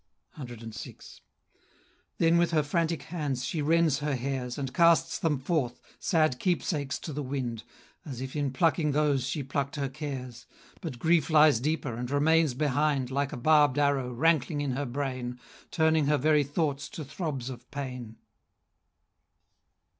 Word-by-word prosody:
CVI. 120 -5 -9 1.0
Then 165 0 +4
with 175 - +3
her 155 -3 +2
frantic 165 +2 -1
hands 145 -7 -3
she 155 +4 -2
rends 160 -1 +3
her 145 -1 -1
hairs, 125 -1 -3
And 135 -3 -4
casts 170 -1 +4
them 155 -3 +1
forth, 130 -3 -1 0.2
sad 155 -7 +2
keepsakes 150 -6 -1
to 155 - -7
the 150 - -3
wind, 130 -4 -3 0.4
As 135 -6 -7
if 130 +2 -6
in 145 -2 0
plucking 155 +1 +2
those 145 -3 +1
she 140 +1 -2
plucked 140 +1 -2
her 140 -2 -2
cares; 135 -4 -7 0.3
But 125 - -5
grief 160 +2 +2
lies 150 -5 +6
deeper, 145 -2 -1
and 120 +2 -4
remains 150 0 +3
behind 145 -1 +1
Like 140 0 -1
a 150 - -5
barb'd 145 0 +4
arrow, 140 -3 +1
rankling 150 +2 +1
in 140 -2 -1
her 135 +2 -2
brain, 125 -1 -4 0.3
Turning 160 -3 +2
her 150 0 +3
very 150 +1 +3
thoughts 145 0 -2
to 155 +1 -7
throbs 140 -4 -4
of 125 -1 -11
pain. 125 -5 -6
145 Hz, 155 wpm, -28 LUFS, 130-155 Hz, 1.0 s, lies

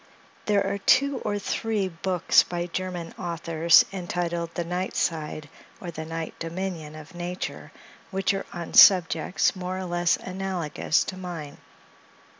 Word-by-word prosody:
There 200 -2 +3
are 200 +1 -2
two 275 +7 +3
or 205 - -2
three 210 0 -1
books 180 0 +3
by 175 -1 -3
German 175 -1 -5
authors, 170 -1 +4
entitled 175 -2 -3
"The 175 - -1
Night 180 +2 -3
Side," 155 -2 -2 0.3
or 175 - -6
"The 160 -1 -6
Night 165 0 -5
Dominion 165 -2 -5
of 155 +3 -11
Nature," 175 +1 -5 0.4
which 195 0 0
are 195 - -4
on 170 -1 -7
subjects, 180 -1 +6
more 185 0 -4
or 190 - -4
less 175 -1 +1
analogous 185 -5 -1
to 185 - -6
mine. 170 -6 -7
175 Hz, 140 wpm, -26 LUFS, 165-190 Hz, 0.4 s, subjects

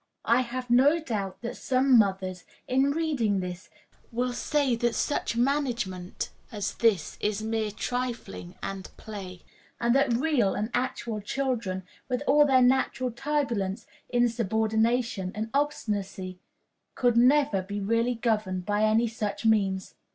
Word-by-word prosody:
I 235 +2 +4
have 250 0 -5
no 275 +6 +6
doubt 210 - -4
that 235 - -4
some 260 0 +3
mothers, 190 -4 +2 0.2
in 265 +2 +3
reading 280 -10 0
this, 180 0 -6 0.4
will 245 +1 -1
say 280 -1 +1
that 240 0 0
such 290 -5 -1
management 240 -9 -1 0.2
as 205 -2 -3
this 215 -9 +1
is 210 0 -1
mere 220 -1 -1
trifling 230 - -4
and 195 -1 -5
play; 190 -5 -8 0.4
and 235 0 +2
that 275 -2 +3
real 245 -6 +2
and 215 +3 -2
actual 235 -3 -2
children, 220 -5 -2 0.3
with 255 +2 -1
all 295 0 +5
their 260 -2 +5
natural 255 0 +2
turbulence, 240 -7 -1 0.2
insubordination, 225 -3 +1
and 220 +1 -4
obstinacy, 200 -10 -2 0.6
can 245 0 +4
never 280 -7 +3
be 200 +2 -5
really 230 +4 +1
governed 210 -6 -1
by 205 +1 0
any 220 +2 +3
such 220 -1 -4
means. 195 -4 +2
230 Hz, 135 wpm, -27 LUFS, 200-255 Hz, 0.6 s, no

